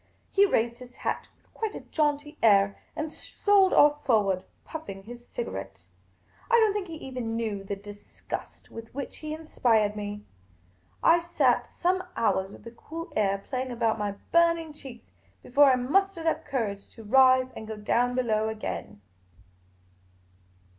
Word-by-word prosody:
He 400 +1 +5
raised 235 - 0
his 250 0 -12
hat - - -3
with - - -35
quite 440 -1 -3
a - - -6
jaunty 295 0 -1
air 200 -2 +5 0.2
and 310 0 -4
strolled 400 -2 +2
oif 295 0 +6
forward, 205 -9 +1 0.2
puffing 195 -12 -7
his 240 +3 -11
cigarette, 95 - -6 0.7
I - - -2
don't 440 -3 +5
think 405 -2 -3
he 330 - -7
even 255 -6 -5
knew 215 -4 -2
the 200 +1 -4
disgust 205 +1 -9
with 230 +1 -10
which 280 -1 -5
he 305 -1 -6
inspired 235 -9 +1
me. 205 0 -5 0.8
I 335 +1 +6
sat 340 0 +1
some 370 +1 0
hours 190 -4 +1
with - - -13
the 230 - -9
cool 325 +8 -8
air 200 -2 +1
playing 255 -1 -2
about 230 -2 0
mj'^ 205 -1 -2
burn 335 0 +5
ing 320 -2 -8
cheeks 265 -5 -12 0.3
before 285 +4 +5
I 265 -2 +6
mustered 335 +7 +1
up 320 0 0
courage 205 -7 -3
to 225 - -11
rise 255 +3 +5
and 220 - -9
go 220 -1 -5
down 245 +4 +1
below 220 -3 +1
again. 215 - -5
245 Hz, 160 wpm, -27 LUFS, 210-310 Hz, 0.8 s, oif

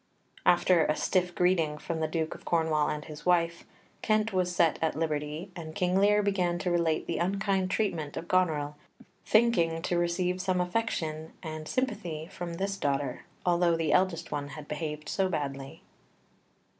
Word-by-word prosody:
After 175 -1 +5
a 150 - +2
stiff 180 0 0
greeting 170 -4 +2
from 165 +1 -4
the 160 - 0
Duke 160 0 -2
of - - -13
Cornwall 160 -3 +1
and 150 0 -3
his 150 -1 -9
wife, 170 -1 +2 0.4
Kent 215 0 +1
was 180 -1 0
set 165 -3 +3
at 160 - +1
liberty, 155 +3 -2
and 160 -2 -7
King 180 -2 +1
Lear 205 +2 +4
began 180 -4 +1
to 180 0 -1
relate 170 -2 +1
the - - -2
unkind 195 +1 0
treatment 170 -8 -1
of 170 - -5
Goneril, 155 -5 +1 0.5
thinking 215 -8 +3
to 175 -1 +1
receive 180 +1 0
some 185 -1 0
affection 175 -5 -2
and 155 -1 -6
sympathy 180 -12 -2
from 175 -2 -5
this 195 +2 -2
daughter, 140 -4 -1 0.2
although 175 -1 +3
the 160 -2 +1
eldest 175 -3 +1
one 145 -1 -2
had 150 0 -9
behaved 150 0 -4
so 190 -1 +1
badly. 140 -4 -4
170 Hz, 165 wpm, -29 LUFS, 155-185 Hz, 0.5 s, After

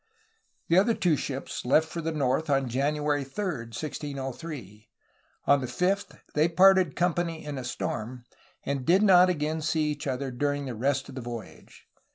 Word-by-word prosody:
The 170 +3 +5
other 225 +4 +2
two 170 -4 +2
ships 135 -1 -4
left 155 +6 +3
for 165 +1 -5
the 165 +1 -2
north 150 +1 0
on 135 -2 +2
January 145 +3 0
3, 135 +10 -5 0.2
1603. 135 - -6 0.6
On 140 -1 +4
the 130 - -3
5th 195 +7 -1
they 155 +2 +3
parted 185 -2 +5
company 170 -2 -1
in 145 -2 -4
a - - -6
storm, 120 0 -4 0.4
and 140 -2 -2
did 185 +9 +4
not 185 -3 +7
again 155 -1 -1
see 155 -1 0
each 145 0 -5
other 135 0 -2
during 145 +3 -1
the 130 - -4
rest 130 +5 0
of - - -9
the 130 - -6
voyage. 120 -2 -9
145 Hz, 170 wpm, -27 LUFS, 130-165 Hz, 0.6 s, not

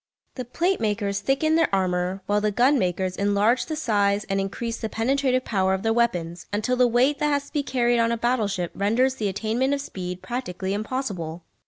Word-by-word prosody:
The 255 - -6
plate 350 +10 0
makers 205 -2 -1
thicken 270 +9 +1
their 330 -1 +3
armour 185 0 0
while 205 +1 +1
the 210 - +1
gun 250 +7 +3
makers 185 0 -1
enlarge 205 +4 +2
the 315 - -3
size 205 -7 +1
and 195 0 -1
increase 230 +4 -4
the 220 - -4
penetrative 255 +2 0
power 190 -3 +1
of 190 - -6
their 225 0 +2
weapons, 180 -8 -1
until 215 +5 0
the 250 0 +4
weight 250 +5 +2
that 300 - +1
has 285 -1 0
to - - -18
be 295 - +1
carried 240 -3 +1
on 230 0 +2
a 235 - 0
battle 235 -2 +1
ship 180 -4 -3
renders 250 +6 +1
the 210 - -1
attainment 230 +8 0
of 280 - -4
speed 180 -7 -6
practically 195 -6 -3
impossible. 200 -7 -4
220 Hz, 205 wpm, -24 LUFS, 195-255 Hz, -, the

